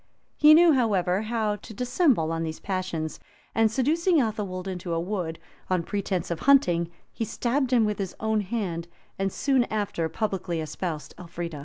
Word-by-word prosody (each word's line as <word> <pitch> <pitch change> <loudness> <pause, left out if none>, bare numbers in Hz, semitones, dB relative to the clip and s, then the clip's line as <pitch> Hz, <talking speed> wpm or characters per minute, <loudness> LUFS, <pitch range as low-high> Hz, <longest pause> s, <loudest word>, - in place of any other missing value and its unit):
He 305 +1 +8
knew, 340 +1 +7
however, 200 -7 +2
how 215 -2 -1
to 220 - -11
dissemble 245 - +2
these 160 -1 -4
passions; 185 -5 -3 0.3
and 225 -1 +3
seducing 320 +8 +2
Athelwold 205 -6 -2
into 180 -2 -3
a - - 0
wood, 175 -3 -3 0.3
on 180 -2 +1
pretence 190 -2 -2
of 170 - -2
hunting, 175 -12 +4 0.2
he - - -3
stabbed 250 +4 -1
him 235 -3 +4
with 210 -1 -2
his 190 -2 -3
own 220 -1 +1
hand, 185 -6 -3 0.3
and 195 0 0
soon 265 +1 +2
after 200 -7 -2
publicly 190 -4 -2
espoused 155 0 -4
Elfrida. 170 -3 -6
200 Hz, 160 wpm, -26 LUFS, 170-235 Hz, 0.3 s, He